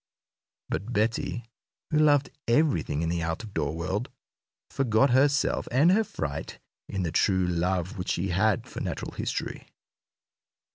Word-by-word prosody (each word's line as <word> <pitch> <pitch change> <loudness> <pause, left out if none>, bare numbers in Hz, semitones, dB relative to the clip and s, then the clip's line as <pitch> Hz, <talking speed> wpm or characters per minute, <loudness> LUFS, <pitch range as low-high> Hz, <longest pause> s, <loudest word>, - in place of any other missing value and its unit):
But 100 +9 -3
Betty, 115 +2 0 0.5
who 155 - +3
loved 145 -2 +4 0.2
everything 120 - +2
in 80 - 0
the 85 0 -1
out 80 +5 -2
of 105 -2 -10
door 75 -1 -1
world, 95 +8 -2 0.6
forgot 125 0 +3
herself 140 +2 +3
and 145 +8 +4
her 220 +4 +4
fright 75 - -5 0.3
in 95 -2 -2
the 85 - -1
true 95 +1 +2
love 90 +3 -1
which 90 - -3
she 95 +3 0
had 95 +3 +2
for - - -7
natural - - -4
history. - - -4
100 Hz, 145 wpm, -27 LUFS, 85-130 Hz, 0.6 s, loved